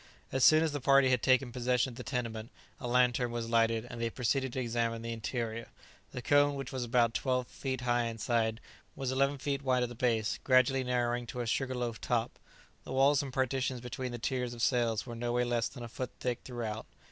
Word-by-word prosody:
As 130 -1 +1
soon 155 +1 +7
as 160 - 0
the 145 -1 -4
party 135 0 +5
had 125 -3 +2
taken 130 -1 +3
possession 125 +1 +1
of - - -12
the 125 - -7
tenement, 115 -4 -4 0.3
a 125 - -4
lantern 125 0 +3
was 120 -1 -3
lighted, 115 0 +2
and 115 - -7
they 115 - 0
proceeded 130 +2 0
to - - -2
examine 115 -1 -1
the 115 0 -3
interior. 115 0 -4 0.4
The 125 - -6
cone, 145 0 +4
which 135 -2 -5
was 130 -2 -3
about 120 -1 +2
twelve 125 -1 0
feet 130 -2 -4
high 120 -1 +1
inside, 115 0 -1 0.3
was 135 -2 -2
eleven 140 +2 +1
feet 140 0 -2
wide 130 -2 +2
at 120 - -2
the - - -7
base, 115 -3 0
gradually 130 0 +4
narrowing 120 -1 0
to 125 - -4
a - - -2
sugar 130 +3 -1
loaf 120 -2 -3
top. 120 -1 -1 0.4
The - - -9
walls 135 +1 +4
and 140 -2 -6
partitions 130 0 0
between 125 +1 -5
the 120 - -4
tiers 125 0 -2
of 115 - -4
cells 115 -4 +1
were 120 - -7
nowhere 120 +1 0
less 120 -1 0
than 125 -3 -9
a - - -5
foot 125 +2 -5
thick 125 -2 -1
throughout. 115 -4 -5
125 Hz, 215 wpm, -31 LUFS, 115-130 Hz, 0.4 s, soon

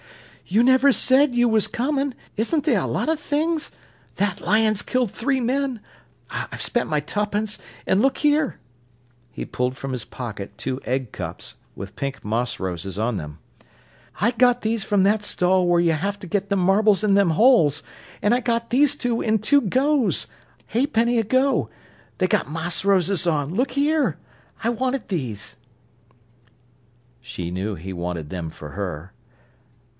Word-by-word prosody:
"You 215 +6 +3
never 260 +2 +5
said 260 +1 +3
you 240 0 +4
was 220 -2 +3
coming—isn't 275 +1 -2
the' 300 - +3
a 200 - +1
lot - - -1
of 320 -1 +1
things?—that 295 - -3
lion's 215 +1 +2
killed 255 -5 -1
three 265 +3 0
men—I've 260 -1 -4
spent 240 - -1
my 150 - +1
tuppence—an' 210 +2 -2
look 270 +2 +2
here." 295 -1 +1 0.7
He - - -6
pulled 125 +1 -2
from 135 -1 -5
his 125 -3 -3
pocket 110 -5 -7
two 130 0 -4
egg 130 -2 -2
cups, - - -6 0.2
with 100 +1 -8
pink 140 -4 -5
moss 115 +3 -1
roses 95 0 -4
on 110 +2 0
them. 75 -3 -7 0.8
"I 230 - +3
got 245 0 +3
these 220 -1 0
from 200 -2 +2
that 205 +2 +2
stall 180 -2 +2
where 175 0 +4
y'ave 175 +4 +1
ter 190 - -9
get 200 +3 -1
them 200 -1 +1
marbles 200 +3 +3
in 205 -2 +3
them 200 -3 +4
holes. 170 - +4 0.4
An' 210 - +4
I 250 - +2
got 230 -1 -1
these 285 +3 +4
two 245 -5 -1
in 220 -1 +1
two 285 +7 +3
goes 260 +3 +1 0.5
'aepenny 240 -1 +2
a - - +2
go 255 - +1 0.5
they've 185 - +2
got - - 0
moss 165 +4 -2
roses 195 -2 +2
on, 150 -1 0
look 255 +7 0
here. 295 +2 +1 0.5
I 230 - +2
wanted 255 +1 -1
these." 120 - -4 1.6
She 95 -9 -6
knew 95 +3 -3
he 95 +3 -7
wanted 85 -3 -4
them 85 -3 -4
for 75 -1 -10
her. 90 -2 -5
205 Hz, 155 wpm, -23 LUFS, -, 1.6 s, never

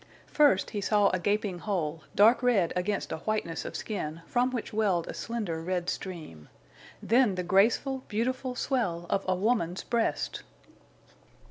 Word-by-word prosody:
First 290 -10 +3
he 210 -2 -3
saw 205 0 +3
a 185 - -1
gaping 205 -1 -1
hole, 165 -6 -2
dark 225 +5 +6
red 230 -9 +2
against 190 +3 -1
a - - -2
whiteness 170 -3 -2
of - - -6
skin, 165 -6 -4
from 250 0 +1
which 245 -4 -5
welled 200 -6 +1
a - - -5
slender 210 -9 -3
red 180 +1 -1
stream. 155 - -7 0.5
Then 235 -4 +3
the 180 - -2
graceful, 225 +9 +2
beautiful 255 +4 -2
swell 195 -12 -1
of 195 - +1
a 185 - +2
woman's 185 -3 0
breast! 230 -10 -1
200 Hz, 150 wpm, -29 LUFS, 175-230 Hz, 0.5 s, dark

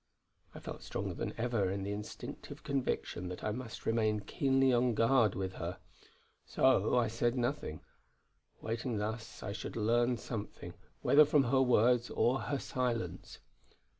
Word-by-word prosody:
I - - -7
felt - - -8
stronger - - -4
than - - -4
ever 115 -4 0
the 100 +1 -3
instinctive 105 +1 -7
conviction 135 -9 -2
that 90 - -7
I 105 - 0
must 115 0 -7
remain 110 -2 +1
keenly 135 +4 +2
on 120 -1 +2
guard 115 -2 +4
with 95 0 -3
her. 85 +2 -4 0.7
So 130 -1 +3
I 120 -2 +3
said 120 +2 0
nothing; 120 - -2 0.8
waiting 115 +1 -2
thus 110 +2 -4
I 100 - -3
should 100 - -6
learn 120 +2 +2
something, 110 -2 -6 0.3
whether 150 +2 +7
from 150 -1 +4
her 130 +1 +3
words 125 -1 +4
or 130 +3 +2
her 140 +6 -2
silence. 125 -3 -3
120 Hz, 145 wpm, -33 LUFS, 105-125 Hz, 0.8 s, whether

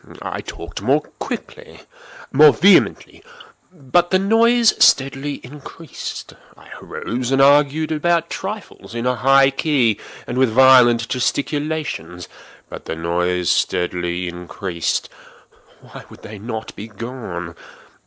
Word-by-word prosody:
I - - -5
talked 85 +3 -9
more 135 +8 +2 0.2
quickly—more 150 +1 -1
vehemently; 200 +2 +2 0.5
but 175 +2 0
the 185 - +3
noise 230 +4 +3
steadily 135 +1 +2
increased. 150 +4 -9 0.2
I - - -18
arose 125 +1 -5
and 135 0 +1
argued 145 +3 +3
about 170 +2 0
trifles, 195 - -7
in 115 +1 -3
a 125 - +2
high 135 +3 +4
key 130 -7 +1 0.3
and 125 - -4
with 130 -2 +3
violent 120 -1 +5
gesticulations; 140 - -3 0.4
but - - -10
the - - -4
noise 90 +2 -1
steadily 90 0 -1
increased. 85 0 -4 0.7
Why - - -12
would - - -16
they 105 -1 -10
not 110 +1 -7
be 105 - -8
gone? 110 -6 -7
130 Hz, 115 wpm, -19 LUFS, 100-150 Hz, 0.7 s, violent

